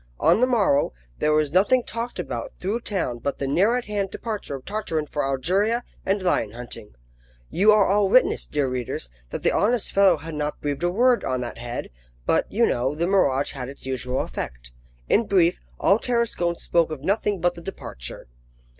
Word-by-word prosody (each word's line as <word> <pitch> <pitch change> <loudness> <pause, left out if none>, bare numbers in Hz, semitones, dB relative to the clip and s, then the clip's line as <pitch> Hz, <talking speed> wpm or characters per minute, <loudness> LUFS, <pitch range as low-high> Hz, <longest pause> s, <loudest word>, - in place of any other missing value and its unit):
On - - +4
the 255 - +5
morrow, 200 - +2 0.3
there 150 - +2
was 150 -1 +2
nothing 210 +7 +4
talked 235 +1 -5
about - - -4
through 205 +6 -2
town 180 - -2
but 140 +4 -3
the 140 - -3
near 190 - +3
at 250 - -4
hand 205 -2 -2
departure 210 -11 -5
of 130 - -10
Tartarin 200 -7 -2
for 145 0 -2
Algeria 190 - +1 0.2
and 195 0 0
lion 115 - +1
hunting. 115 - -9 0.6
You 205 +4 +5
are 210 -2 +5
all 200 0 +3
witness, 255 +5 +3
dear 145 -2 0
readers, 125 - -4 0.2
that - - -5
the - - +3
honest 230 +1 +1
fellow 195 -4 +5
had 160 +2 -8
not 150 0 -3
breathed 145 0 -3
a 175 - +2
word 240 +6 +3
on 130 -1 -1
that 120 -1 -6
head; 120 - -5 0.3
but, - - +1
you - - +3
know, 130 +4 0
the 165 +3 0
mirage 145 -8 +2
had 130 -2 -6
its 140 - -11
usual 130 -1 -2
effect. - - -6 0.4
In 225 0 +3
brief, 180 -3 +3 0.2
all 200 +3 +4
Tarascon 235 -9 0
spoke 170 -1 +1
of 155 -4 -6
nothing 200 +1 0
but 175 +1 +2
the 170 - -11
departure. 65 - -7
175 Hz, 190 wpm, -24 LUFS, 135-205 Hz, 0.6 s, the